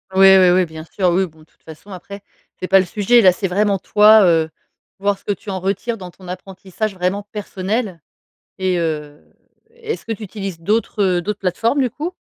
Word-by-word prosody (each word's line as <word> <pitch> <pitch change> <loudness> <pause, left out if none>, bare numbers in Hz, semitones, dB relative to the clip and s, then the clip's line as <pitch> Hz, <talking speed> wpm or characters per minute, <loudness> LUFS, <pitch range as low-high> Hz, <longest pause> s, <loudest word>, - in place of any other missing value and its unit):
Oui 190 0 +7
oui 185 -1 +6
oui, 180 0 +3
bien 160 -1 -10
sûr. 180 +3 -1
Oui 190 +2 +2
bon, 160 -3 -16
de - - -17
toute - - -38
façon 160 +5 -13
après, 200 +2 -9 0.4
c'est 185 - -4
pas 195 +1 +5
le 190 - +1
sujet, 210 +6 +3
là 185 -3 +7
c'est 190 +2 -3
vraiment 200 +2 +1
toi, 210 +3 +6
heu, 165 -2 +2 0.5
voir 200 0 0
ce - - -27
que 205 - -1
tu 205 +1 -11
en 190 - -3
retires 200 +5 -2
dans 180 -3 -9
ton 185 0 -16
apprentissage 190 +3 -5
vraiment 185 +2 -2
personnel 200 -2 -3 0.6
et, 185 -2 0
heu, 150 -3 -4 0.5
est-ce 460 -1 -7
que 225 - -5
tu 220 0 -5
utilises 195 -4 -6
d'autres, 210 +4 -1
heu, 180 -2 +1
d'autres 205 +3 -4
plateformes 225 +9 0
du 255 - +1
coup? 320 +9 -5
190 Hz, 210 wpm, -19 LUFS, 180-210 Hz, 0.6 s, Oui